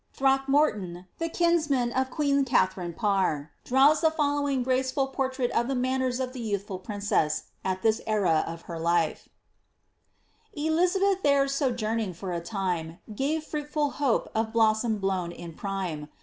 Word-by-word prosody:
Throckmorton, 270 - +1
the 330 0 -1
kinsman 310 -8 +2
of 260 +1 0
queen 280 0 +1
Katharine 185 -8 +1
Parr, 185 -8 0
draws 275 +4 +4
the 320 - +5
fol* 290 -2 0
lowing 275 -3 0
graceful 260 +2 +1
portrait 265 -2 -2
of 235 +1 +1
the 270 - -1
manners 255 0 0
of 255 -1 -3
the 260 - -7
youthful 200 -3 -3
princess 200 -6 0 0.2
at 185 0 -2
this 220 -1 +2
en 215 -3 +1
of 165 0 0
her 170 -2 -6
life: 170 -1 0 1.2
Elizabeth 360 +6 +1
there 280 -3 +3
sojourning 230 - -1
for 180 +1 -5
a 170 - -2
time, 175 -4 -3 0.2
Crave 300 +6 -1
fruitful 295 -1 -2
hope 275 -5 +1
of 220 0 -1
blossom 220 0 +2
blown 190 -3 -1
in 170 -1 -9
prime. 180 -6 -4
240 Hz, 150 wpm, -27 LUFS, 190-280 Hz, 1.2 s, the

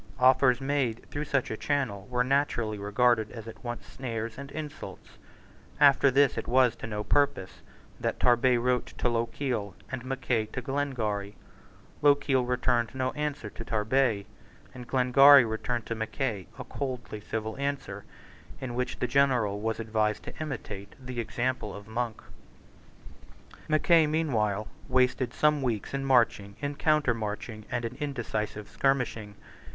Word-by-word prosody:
Offers 130 -1 +5
made 135 -4 -1
through 145 +1 -3
such 135 -2 0
a - - -1
channel 110 -7 -2
were 125 0 +1
naturally 125 -5 0
regarded 110 +2 +2
as 115 -1 -9
at 110 -1 -10
once 120 -1 -5
snares 115 -3 -5
and 140 0 -8
insults. 150 -11 -8 0.6
After 140 -1 +6
this 140 +1 +3
it - - -7
was 125 -1 +4
to - - -6
no 105 -1 -3
purpose 140 -10 0 0.4
that - - -2
Tarbet 125 0 +4
wrote 125 +1 0
to - - 0
Lochiel 115 -3 -2 0.2
and 130 -2 -4
Mackay 125 -4 -1
to 125 - -3
Glengarry. 115 -8 -2 0.7
Lochiel 140 -3 +3
returned 125 -1 +1
no 130 0 0
answer 150 -5 -3
to - - -8
Tarbet; 110 -1 +1 0.5
and 125 -1 -9
Glengarry 135 +1 +7
returned 115 +1 -3
to - - -3
Mackay 110 -2 -3
a - - -5
coldly 125 -6 -5
civil 110 +1 -4
answer, 140 -8 -3 0.6
in 130 -2 -5
which 125 +1 -2
the 125 - -1
general 120 -6 +2
was 110 +1 -2
advised 110 -1 0
to - - -8
imitate 105 -9 -6
the 130 -2 -6
example 120 -1 -2
of 100 +1 -10
Monk, 115 0 -3 1.4
Mackay, 155 +1 +4
meanwhile, 110 -10 0 0.2
wasted 125 -1 +2
some 150 +1 +2
weeks 115 -4 -2
in 135 0 -1
marching, 115 -6 +2
in 145 0 -2
countermarching, 115 -8 0
and 120 -1 -2
in 115 +2 -5
indecisive 115 -7 -3
skirmishing. 120 -6 -1
125 Hz, 145 wpm, -28 LUFS, 110-135 Hz, 1.4 s, Glengarry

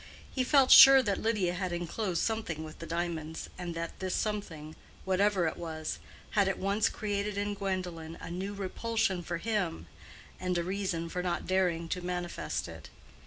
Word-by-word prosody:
He 260 - +1
felt 270 0 +4
sure 270 -1 +11
that 200 -4 0
Lydia 210 -6 +1
had 180 0 -3
enclosed 175 +1 -2
something 215 -9 -2
with 155 0 -10
the 165 - -7
diamonds, 165 -2 -3
and 175 -2 -5
that 165 0 -5
this 185 -1 -2
something, 165 -8 -3 0.3
whatever 190 -1 +2
it 160 - -2
was, 160 -2 -4 0.3
had 200 -2 +3
at 190 - 0
once 200 +2 +1
created 205 -1 -3
in 205 0 -1
Gwendolen 180 -5 -4
a - - -7
new 195 +3 -4
repulsion 200 -1 -1
for 170 0 -3
him 185 - -2 0.5
and 180 -1 -1
a 170 - 0
reason 185 -2 -2
for 180 +2 -3
not 175 -1 -2
daring 180 -3 +1
to 180 - -2
manifest 175 -1 -3
it. - - -10
185 Hz, 170 wpm, -30 LUFS, 170-205 Hz, 0.5 s, sure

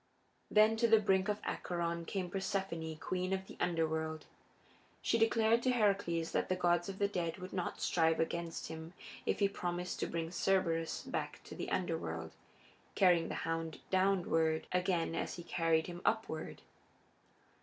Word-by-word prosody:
Then 215 +1 +5
to 235 +1 +3
the 225 0 +7
brink 190 -2 +2
of 210 0 0
Acheron 170 -1 -2
came 180 0 -3
Persephone, 190 -5 -2
queen 185 +3 -2
of 190 0 -2
the - - -11
Underworld. 160 -2 -1 0.7
She 230 - +1
declared 225 +1 +4
to 255 - +1
Heracles 200 -8 +1
that - - 0
the 185 - +2
gods 175 0 +2
of 195 - -5
the 200 - +2
dead 175 -5 -2
would 185 0 -8
not 180 -2 -2
strive 165 -1 +2
against 165 0 -2
him 160 +1 -7 0.3
if - - +2
he 200 - +4
promised 180 -2 -3
to - - 0
bring 165 0 -3
Cerberus 170 -3 +1
back - - -3
to - - -10
the - - -4
Underworld, 85 - -2 0.6
carrying 175 -3 +5
the - - -3
hound 165 -1 -2
downward 175 -4 +2
again 180 -2 +1
as - - -2
he 175 - -7
carried 165 -2 +1
him 175 0 -7
upward. 220 -8 -1
175 Hz, 160 wpm, -35 LUFS, 165-195 Hz, 0.7 s, the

